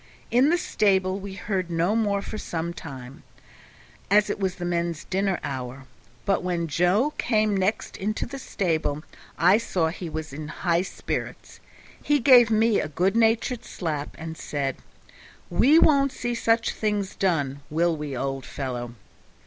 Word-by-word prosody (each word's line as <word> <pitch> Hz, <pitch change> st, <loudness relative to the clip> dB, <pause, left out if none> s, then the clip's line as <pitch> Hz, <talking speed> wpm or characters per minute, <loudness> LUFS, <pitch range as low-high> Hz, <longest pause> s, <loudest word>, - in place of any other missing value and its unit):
In 255 Hz, +5 st, +5 dB
the 345 Hz, -, +3 dB
stable 190 Hz, -, +1 dB
we 195 Hz, -1 st, -7 dB
heard 190 Hz, -3 st, -2 dB
no 170 Hz, +5 st, +1 dB
more 205 Hz, -3 st, +1 dB
for 215 Hz, -, -6 dB
some 170 Hz, 0 st, -3 dB
time, 135 Hz, -6 st, -9 dB, 0.9 s
as 210 Hz, +1 st, +4 dB
it -, -, -4 dB
was 190 Hz, -2 st, -1 dB
the 175 Hz, -, -5 dB
men's 170 Hz, -2 st, -1 dB
dinner 195 Hz, -1 st, 0 dB
hour, 130 Hz, 0 st, -5 dB, 0.4 s
but 195 Hz, -1 st, +2 dB
when 175 Hz, -2 st, -1 dB
Joe 180 Hz, -, +2 dB
came 215 Hz, -3 st, +2 dB
next 195 Hz, +3 st, -1 dB
into 215 Hz, +3 st, -2 dB
the 275 Hz, +3 st, -7 dB
stable 160 Hz, -, -1 dB, 0.3 s
I 185 Hz, +5 st, +5 dB
saw 175 Hz, -8 st, 0 dB
he 170 Hz, +1 st, -6 dB
was 155 Hz, -2 st, -5 dB
in 150 Hz, +1 st, -6 dB
high 170 Hz, +2 st, 0 dB
spirits; 190 Hz, -, -5 dB, 0.4 s
he 295 Hz, 0 st, +2 dB
gave 245 Hz, -2 st, +7 dB
me 225 Hz, 0 st, +3 dB
a -, -, -3 dB
good 180 Hz, +7 st, 0 dB
natured 230 Hz, +2 st, +2 dB
slap, 150 Hz, -5 st, -4 dB
and 160 Hz, 0 st, -6 dB
said, 140 Hz, -3 st, -2 dB, 0.7 s
"We 290 Hz, +6 st, +5 dB
won't 275 Hz, -4 st, +5 dB
see 240 Hz, -2 st, -3 dB
such 230 Hz, 0 st, +1 dB
things 210 Hz, -2 st, -2 dB
done, 145 Hz, -7 st, 0 dB
will 165 Hz, +2 st, +1 dB
we, 150 Hz, -4 st, -5 dB
old 135 Hz, 0 st, -3 dB
fellow?" 120 Hz, -3 st, -5 dB
185 Hz, 155 wpm, -25 LUFS, 160-215 Hz, 0.9 s, gave